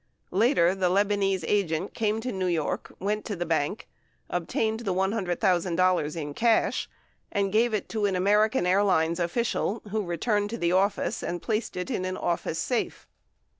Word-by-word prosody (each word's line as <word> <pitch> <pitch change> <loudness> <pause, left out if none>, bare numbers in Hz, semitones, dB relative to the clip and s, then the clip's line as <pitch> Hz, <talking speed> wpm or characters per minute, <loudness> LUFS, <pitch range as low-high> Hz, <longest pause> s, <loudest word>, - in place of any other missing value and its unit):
Later, 195 -3 +3
the 190 -2 +1
Lebanese 195 -1 +1
agent 190 -3 0
came 220 0 0
to 250 +2 -3
New 190 -2 -1
York, 165 -4 -1
went 210 +3 -2
to 205 - -3
the 175 -1 -3
bank, 160 +4 -1 0.4
obtained 220 +6 -1
the 195 -6 -2
$100,000 185 -4 +1
in 145 -3 -4
cash, 230 +6 +2 0.4
and 200 -1 0
gave 225 +1 +3
it 205 - -3
to 215 -2 -1
an 195 - -1
American 210 +4 +3
Airlines 180 -3 +2
official, 215 +4 -1
who 215 0 0
returned 205 +4 0
to 230 - -4
the 170 -5 +1
office 195 +2 +1
and 175 - -3
placed 215 +1 -2
it 180 +8 -3
in 200 -6 -1
an 185 0 -3
office 170 -2 -2
safe. 240 +8 -2
195 Hz, 165 wpm, -27 LUFS, 175-215 Hz, 0.4 s, Later